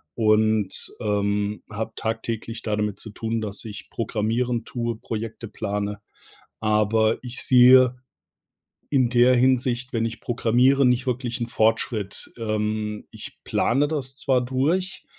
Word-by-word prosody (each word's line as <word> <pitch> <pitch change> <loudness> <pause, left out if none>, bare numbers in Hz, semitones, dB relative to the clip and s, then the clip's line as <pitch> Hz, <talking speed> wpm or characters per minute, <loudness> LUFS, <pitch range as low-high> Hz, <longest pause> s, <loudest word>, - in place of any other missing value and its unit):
und, 110 -2 +2
ähm, 105 -1 -1
habe 110 +1 -4
tagtäglich 115 0 -4
damit 105 -2 -2
zu 110 - -8
tun, 115 +1 -3
dass 105 -2 -5
ich 105 -3 -9
programmieren 115 +1 -1
tue, 120 -3 -3
Projekte 115 +1 -6
plane, 105 0 -4 0.6
aber 110 +1 +2
ich 125 0 -6
sehe 125 0 +6 1.0
in 130 -4 +2
der 125 +1 +5
Hinsicht, 125 0 +1
wenn 115 -2 0
ich 115 -1 -7
programmiere, 125 +3 +3
nicht 125 +1 +2
wirklich 125 -1 -2
'n 120 - -2
Fortschritt. 110 -2 -1
Ähm, 105 -1 -2
ich - - -10
plane 135 +5 +1
das 135 -4 -4
zwar 130 -2 +1
durch 155 +10 -1
115 Hz, 125 wpm, -24 LUFS, 105-125 Hz, 1.0 s, sehe